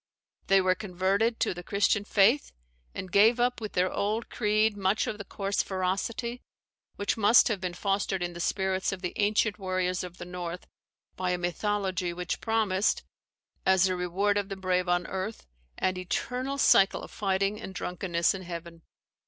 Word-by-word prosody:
They 195 0 +5
were 185 0 +3
converted 195 +4 0
to - - +2
the 175 - -7
Christian 200 +2 +1
faith; 220 +8 +3 0.4
and 185 - -6
gave 220 +5 +5
up 245 0 +1
with 215 - -5
their 180 +1 +1
old 215 +3 -1
creed 215 -1 +2
much 195 +1 +1
of 210 - -4
the - - -5
coarse 195 0 -1
ferocity, 195 +6 -2 0.5
which 205 +2 -1
must 220 +3 +6
have 205 -4 -2
been 180 -2 -3
fostered 195 -1 -1
in 175 0 -3
the 170 - -8
spirits 190 +1 0
of 190 -1 -6
the 180 - -2
ancient 210 +1 +1
warriors 185 -1 -1
of 180 -1 -8
the - - -7
North 180 0 -6 0.5
by 185 -1 -2
a 180 - +1
mythology 185 0 -1
which 180 -1 -4
promised, 215 -3 +1 0.6
as 190 -1 +4
the 185 -1 +2
reward 190 +3 +1
of 200 -1 -4
the 195 - -4
brave 185 -1 0
on 175 0 +2
earth, 190 +5 -5 0.3
an 185 0 0
eternal 250 +9 -2
cycle 195 -7 +4
of - - -10
fighting 195 +1 -1
and 190 - -8
drunkenness 180 -2 0
in 195 - -6
heaven. 170 -1 -8
190 Hz, 175 wpm, -28 LUFS, 180-210 Hz, 0.6 s, must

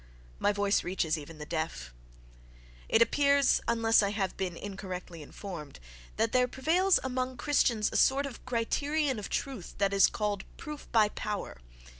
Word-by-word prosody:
My - - +3
voice 205 0 +1
reaches 175 -3 0
even 155 +1 -9
the 150 - -7
deaf.—It - - -3
appears, 280 +2 +3
unless 225 -1 +4
I 200 - +1
have 200 -2 -2
been 180 -3 -3
incorrectly 185 -4 -7
informed, 155 -2 -8 0.4
that 225 0 +1
there 250 0 +3
prevails 340 +9 +2
among 255 0 -2
Christians 235 -7 +2
a - - 0
sort 275 +2 +4
of 270 -5 -8
criterion 265 +3 0
of 205 - -6
truth 260 -10 -4
that 200 0 +1
is 195 -1 +6
called 205 -2 -2
"proof 300 -2 -8
by 215 -2 +4
power." 210 - -5
205 Hz, 150 wpm, -30 LUFS, 165-255 Hz, 0.4 s, is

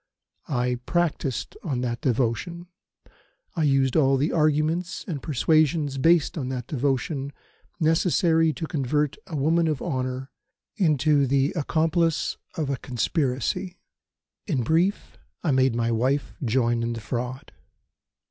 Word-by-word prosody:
I 125 -2 0
practised 165 -6 -1
on 135 -7 -2
that 120 -1 -3
devotion; 130 +8 -1 0.9
I 165 - -1
used 135 -2 +2
all 135 -3 +4
the 145 +5 +1
arguments 155 +3 0
and 155 -7 -4
persuasions 150 -1 +1
based 165 +1 +3
on 130 -2 -3
that 125 -2 -4
devotion 135 +1 -1 0.5
necessary 165 0 +3
to 160 - -4
convert 150 -1 -1
a 165 - -6
woman 160 +4 +2
of 155 -3 0
honour 130 -3 -3 0.4
into 150 - +3
the 135 +2 +2
accomplice 165 +1 0 0.2
of 155 -3 -1
a 135 - -1
conspiracy. 140 +8 -1 0.7
In 140 - 0
brief, 170 - 0 0.2
I 160 - +2
made 130 -2 +3
my 115 0 0
wife 130 +5 0
join 120 -1 +1
in 115 0 -1
the 115 - -5
fraud. 125 +3 -5
140 Hz, 130 wpm, -25 LUFS, 130-160 Hz, 0.9 s, all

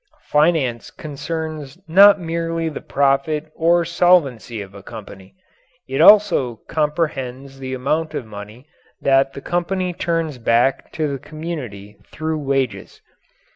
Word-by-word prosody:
Finance 150 -6 +2
concerns 155 -1 -6
not 200 +5 +7
merely 165 -1 -2
the 150 - -7
profit 145 +3 0
or 170 +1 +2
solvency 160 -10 +2
of 100 -1 -8
a 100 - -11
company; 100 -2 -11 0.5
it - - -1
also 200 - +6
comprehends 140 -4 -2
the 130 -1 -4
amount 155 +5 -1
of - - -4
money 105 +4 -10 0.3
that 135 0 +2
the 140 - -8
company 180 +3 -1
turns 165 -5 -2
back 120 +3 +1
to 155 -2 -1
the 140 -2 -4
community 125 -11 -7
through 155 0 -3
wages. 135 -2 -2
150 Hz, 125 wpm, -20 LUFS, 130-165 Hz, 0.5 s, not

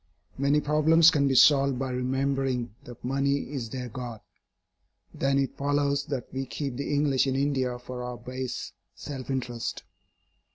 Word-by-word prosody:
Many 140 +2 +2
problems 155 +2 +5
can 140 -1 +2
be 135 - +1
solved 140 -1 +6
by 130 0 -2
remembering 130 -1 -1
that 120 -2 -10
money 140 +1 0
is 120 -5 -3
their 125 +1 -5
God. 120 -1 -6 0.9
Then 135 0 +1
it 135 -1 0
follows 140 0 0
that 135 -5 -4
we 135 0 -3
keep 135 -1 -4
the 140 - -3
English 140 -2 +2
in 130 - 0
India 135 -3 0
for 125 0 -7
our 125 0 -5
base 130 0 -5 0.2
self 135 -3 -7
interest. 120 -3 -3
135 Hz, 155 wpm, -27 LUFS, 125-140 Hz, 0.9 s, solved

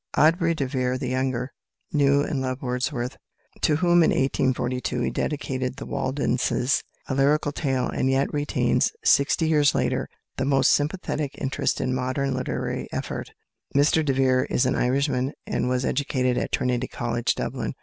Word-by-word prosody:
Aubrey 165 +1 +3
de 140 - -1
Vere, 130 -1 -1
the 125 - -3
younger, 130 0 -1 0.4
knew 140 -1 +4
and 140 -2 -2
loved 130 +1 -3
Wordsworth, 125 0 -2 0.4
to 150 - +3
whom 175 +1 +4
in 160 - +4
1842 130 -1 0
he - - 0
dedicated 130 -3 -2
"The - - -7
Waldenses: 130 -1 0 0.3
A - - -2
Lyrical 145 +2 +2
Tale," 135 -4 -1
and 130 - 0
yet 135 +1 +1
retains, 145 0 +1
sixty 145 +3 +3
years 150 -2 +3
later, - - 0 0.3
the 135 - 0
most 135 -1 +4
sympathetic 150 -2 -1
interest 135 -2 -1
in 130 - -1
modern 130 +2 -1
literary 130 - -3
effort. - - -4 0.5
Mr 150 +3 +4
de 140 -3 +1
Vere 130 -1 +2
is 125 - +1
an 130 - +2
Irishman, 130 +1 0
and - - -1
was 130 0 0
educated 130 -3 0
at - - -2
Trinity 125 0 0
College, 120 -1 -1
Dublin. - - -3
135 Hz, 160 wpm, -25 LUFS, 130-145 Hz, 0.5 s, knew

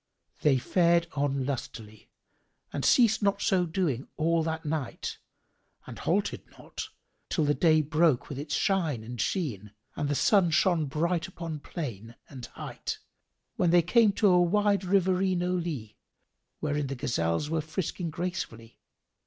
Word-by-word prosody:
They 145 -3 +4
fared 170 +5 +3
on 140 -2 -1
lustily 110 -5 -6 0.6
and 140 - -3
ceased 230 -4 +4
not 200 -1 +2
so 185 -4 +2
doing 160 -7 -1
all 165 +1 +2
that 160 0 -3
night 150 -4 -3 0.7
and - - -9
halted - - 0 0.2
not - - -7 0.4
till 155 - +1
the 145 - +3
day 155 -1 +4
broke 155 -2 +2
with 140 - -6
its 145 +1 -3
shine 165 - 0
and 120 +1 -5
sheen 105 - -2 0.2
and 145 - -2
the 145 - +1
sun 180 - +4
shone 165 -2 +2
bright 165 +4 -1
upon 165 -4 -6
plain 120 - -6
and 130 -4 -8
height - - -6 0.6
when 175 - +3
they 175 0 +5
came 220 +4 +4
to 210 - +3
a 180 -1 +5
wide 200 +2 +2
riverino 185 -1 +1
lea 150 -12 -4 0.7
wherein 150 -2 -1
the 135 - -4
gazelles 115 - -1
were 165 -1 +1
frisking 165 +2 -3
gracefully. 160 -9 -5
160 Hz, 145 wpm, -28 LUFS, 140-180 Hz, 0.7 s, they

